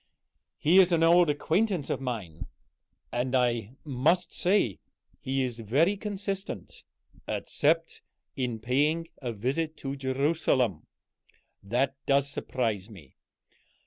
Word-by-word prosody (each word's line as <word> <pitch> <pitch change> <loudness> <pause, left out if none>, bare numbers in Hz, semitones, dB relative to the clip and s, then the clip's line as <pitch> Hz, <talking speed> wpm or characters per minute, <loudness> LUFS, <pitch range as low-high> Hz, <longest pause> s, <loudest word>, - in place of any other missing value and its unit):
"He 175 +5 +5
is 185 -1 +6
an 165 -1 +3
old 170 0 +6
acquaintance 165 +3 0
of - - -2
mine. 110 - -5 0.6
And 125 +2 -1
I 120 -2 +1
must 155 +6 +1
say 175 - +1 0.4
he 135 0 -1
is 120 -2 -3
very 145 - +2
consistent 195 - -5 0.5
except 165 +3 0 0.3
in 125 -4 -2
paying 145 +8 0
a 125 -3 -3
visit 140 +9 -2
to 135 -1 -4
Jerusalem. 130 - 0 0.7
That 130 +6 0
does 140 0 +3
surprise 115 -7 -2
me. 85 -12 -14
135 Hz, 110 wpm, -28 LUFS, 120-165 Hz, 0.7 s, is